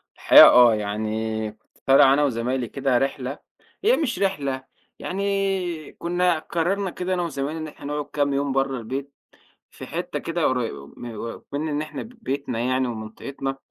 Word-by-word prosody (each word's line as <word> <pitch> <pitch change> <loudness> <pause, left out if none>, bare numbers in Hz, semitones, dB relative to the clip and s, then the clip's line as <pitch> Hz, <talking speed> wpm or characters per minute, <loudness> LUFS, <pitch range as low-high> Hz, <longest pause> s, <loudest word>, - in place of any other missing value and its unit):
الحقيقة - - +9
آه، 120 -3 +7
يعني 110 +1 -2
كنت 110 - -30
طالع 135 0 +7
أنا 145 +1 +3
وزمايلي 125 -1 -1
كده 135 -1 0
رحلة 135 +1 -2 0.4
هي 465 +4 +4
مش 280 -7 -1
رحلة، 140 -9 -1 0.4
يعني 195 -4 -2
كنا 175 -1 0
قررنا 185 +5 -1
كده 180 +1 -3
أنا 180 - 0
وزمايلي 150 -1 -3
إن 155 - -5
إحنا 145 - -12
نقعُد 150 0 -3
كام 145 -1 +1
يوم 140 0 0
برّه 135 0 0
البيت، 135 +4 -5 0.6
في - - -9
حتة - - -4
كده 170 0 -1
قريبه 120 - -1
م - - -8 0.2
أكمن 145 +6 -5
إن 150 0 -1
إحنا 155 -2 -6
بيتنا 145 - -4
يعني 130 +2 +1
ومنطقتنا 125 +4 -5
140 Hz, 160 wpm, -24 LUFS, 125-170 Hz, 0.6 s, الحقيقة